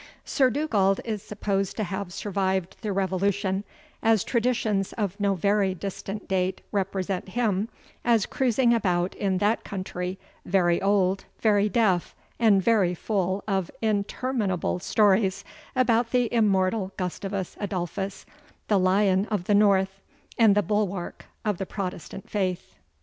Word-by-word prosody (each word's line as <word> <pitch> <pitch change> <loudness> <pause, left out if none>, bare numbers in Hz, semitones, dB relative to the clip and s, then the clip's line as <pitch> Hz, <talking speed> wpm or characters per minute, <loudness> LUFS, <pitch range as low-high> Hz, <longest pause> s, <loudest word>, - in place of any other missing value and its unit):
Sir 265 -3 +3
Dugald 215 -8 +1
is 215 -3 -3
supposed 195 -2 -2
to 215 - 0
have 195 -1 -4
survived 190 -2 -1
the 215 -3 -2
Revolution, 195 +1 0 0.4
as 225 -3 +3
traditions 225 -5 0
of 205 -2 -3
no 200 -1 +2
very 200 +1 +1
distant 195 +2 -6
date 185 0 0
represent 195 -2 -2
him 215 -1 0 0.3
as 230 -4 +3
cruising 250 -1 +2
about 180 -5 +1
in 195 -2 -1
that 205 +4 +1
country, 185 -1 -4 0.3
very 175 -2 +2
old, 195 -1 +2
very 210 -1 +3
deaf, 200 -7 +1 0.2
and 210 -5 +4
very 195 -6 +3
full 190 0 -1
of 190 -4 0
interminable 210 -3 -1
stories 195 0 +2 0.3
about 240 -2 +3
the 245 -2 +1
immortal 195 -3 +2
Gustavus 190 +1 -3
Adolphus, 195 -1 -4 0.4
the 205 -2 +4
Lion 190 +1 +3
of 205 -5 -1
the 205 - +1
North, 195 -1 +3 0.3
and 220 -4 +5
the 205 - +3
bulwark 200 -4 -2 0.2
of 210 -4 0
the 195 - -3
Protestant 190 -1 -6
Faith. 185 -3 -2
195 Hz, 135 wpm, -26 LUFS, 190-215 Hz, 0.4 s, and